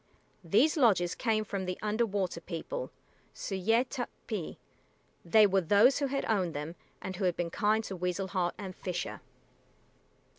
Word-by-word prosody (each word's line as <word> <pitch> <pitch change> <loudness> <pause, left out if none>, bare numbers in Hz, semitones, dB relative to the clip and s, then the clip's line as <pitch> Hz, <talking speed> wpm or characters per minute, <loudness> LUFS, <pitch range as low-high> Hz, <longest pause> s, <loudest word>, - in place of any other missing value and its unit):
These 225 - +3
lodges 190 - +4
came 220 -3 0
from 195 -2 -3
the 185 0 -3
Under 215 +2 0
water 190 -4 -2
People 185 - -5 0.5
S[=u]´y[=e] 220 +6 +1
t[)u]p´p[)i]. 225 - -5 0.7
They 215 +5 +6
were 195 -1 +3
those 205 - +5
who 280 - +1
had 275 +1 -2
owned 185 -7 0
them 150 +3 -4 0.3
and 185 -1 -5
who 195 - -1
had 180 -2 +1
been 170 -1 -2
kind 215 +4 +2
to 195 - -5
Weasel 180 +2 -2
Heart 180 -2 0
and 190 -3 -7
Fisher. 180 -1 -4
195 Hz, 155 wpm, -31 LUFS, 180-220 Hz, 0.7 s, They